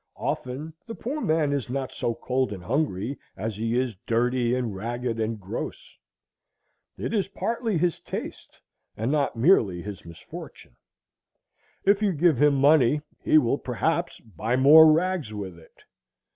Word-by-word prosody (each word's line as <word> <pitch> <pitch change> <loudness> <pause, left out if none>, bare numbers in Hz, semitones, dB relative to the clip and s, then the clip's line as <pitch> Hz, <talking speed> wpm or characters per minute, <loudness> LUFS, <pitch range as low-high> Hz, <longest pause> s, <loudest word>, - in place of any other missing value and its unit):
Often 140 +6 -4
the 225 - -6
poor 290 +6 -4
man 155 - +1
is 140 -4 -2
not 135 0 -3
so 115 - -2
cold 130 +1 -1
and 95 -4 -7
hungry 125 - -1 0.2
as 110 -1 -3
he 115 +3 -1
is 125 -4 -1
dirty 120 +1 +1
and 120 -5 -2
ragged 120 +3 -3
and 110 0 -2
gross. 95 -1 -6 1.0
It - - -4
is 205 -4 +1
partly 225 0 -2
his 175 +1 0
taste, - - -7 0.4
and 115 +5 -1
not 145 -4 0
merely 115 - +3
his 100 -3 -7
misfortune. 85 -6 -11 1.1
If 200 +1 +4
you 205 -3 +2
give 160 -4 +2
him 150 -1 +5
money, 145 0 +4 0.2
he - - +5
will 135 -1 +2
perhaps 120 -6 -1
buy 110 +4 -3
more 155 +4 +8
rags 165 -8 0
with 95 -4 -6
it. 80 - -21
130 Hz, 150 wpm, -25 LUFS, 115-155 Hz, 1.1 s, more